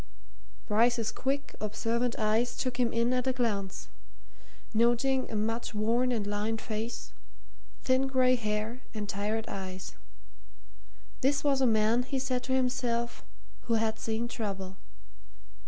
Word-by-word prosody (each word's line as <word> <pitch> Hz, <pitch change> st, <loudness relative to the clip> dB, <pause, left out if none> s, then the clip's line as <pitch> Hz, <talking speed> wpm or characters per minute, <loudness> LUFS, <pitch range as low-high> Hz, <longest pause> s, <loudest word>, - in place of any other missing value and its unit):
Bryce's 230 Hz, +1 st, +3 dB
quick, 275 Hz, +4 st, -2 dB
observant 230 Hz, +3 st, 0 dB
eyes 220 Hz, +3 st, +1 dB
took 255 Hz, -2 st, -1 dB
him 240 Hz, -2 st, +3 dB
in 235 Hz, +2 st, +2 dB
at 250 Hz, +1 st, 0 dB
a 260 Hz, -, +3 dB
glance, 205 Hz, -6 st, -1 dB, 0.9 s
noting 240 Hz, +4 st, +3 dB
a -, -, -4 dB
much 225 Hz, +2 st, -1 dB
worn 235 Hz, +4 st, +2 dB
and 220 Hz, -4 st, 0 dB
lined 210 Hz, +2 st, -1 dB
face, 225 Hz, +2 st, -4 dB, 0.7 s
thin 260 Hz, +1 st, +3 dB
grey 255 Hz, -1 st, +4 dB
hair 215 Hz, +1 st, -2 dB
and 210 Hz, -1 st, -3 dB
tired 210 Hz, +3 st, -1 dB
eyes; 190 Hz, -2 st, -5 dB, 1.3 s
this 280 Hz, +2 st, +2 dB
was 275 Hz, -2 st, +3 dB
a 260 Hz, -, +5 dB
man, 220 Hz, +1 st, +4 dB
he 265 Hz, +2 st, -2 dB
said 255 Hz, -1 st, 0 dB
to 260 Hz, -, -1 dB
himself, 245 Hz, -2 st, 0 dB, 0.4 s
who 230 Hz, -, +2 dB
had 220 Hz, 0 st, +1 dB
seen 225 Hz, +1 st, -1 dB
trouble. 195 Hz, -5 st, -4 dB
230 Hz, 135 wpm, -30 LUFS, 215-250 Hz, 1.3 s, a